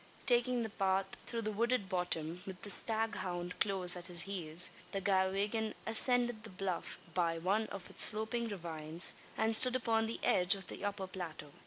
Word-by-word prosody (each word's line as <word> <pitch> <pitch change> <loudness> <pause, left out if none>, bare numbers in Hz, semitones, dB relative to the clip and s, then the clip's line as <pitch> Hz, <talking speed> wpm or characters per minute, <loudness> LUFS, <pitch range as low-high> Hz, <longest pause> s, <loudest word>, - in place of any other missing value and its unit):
Taking 245 0 +2
the 220 - -5
path 195 -1 -1 0.2
through 230 -1 -4
the 215 - -3
wooded 235 0 -1
bottom 175 -2 -4
with 190 -2 -9
the 205 - +3
staghound 195 -6 -1
close 190 -4 +6
at 180 0 -5
his 175 -2 +5
heels 175 -3 -3 0.2
the 195 - -2
Galwegian 200 +3 -1
ascended 240 0 +1
the 225 - -10
bluff, 185 -2 -5 0.2
by 170 -2 -1
one 200 +6 -1
of 195 -2 -9
its - - +3
sloping 220 +2 +3
ravines, 165 -4 0 0.2
and 225 0 +1
stood 255 +3 +7
upon 225 -3 0
the 230 - -5
edge 180 +2 +5
of 195 -1 -8
the - - -8
upper 200 -1 -4
plateau. 170 -5 -8
195 Hz, 175 wpm, -33 LUFS, 180-225 Hz, 0.2 s, stood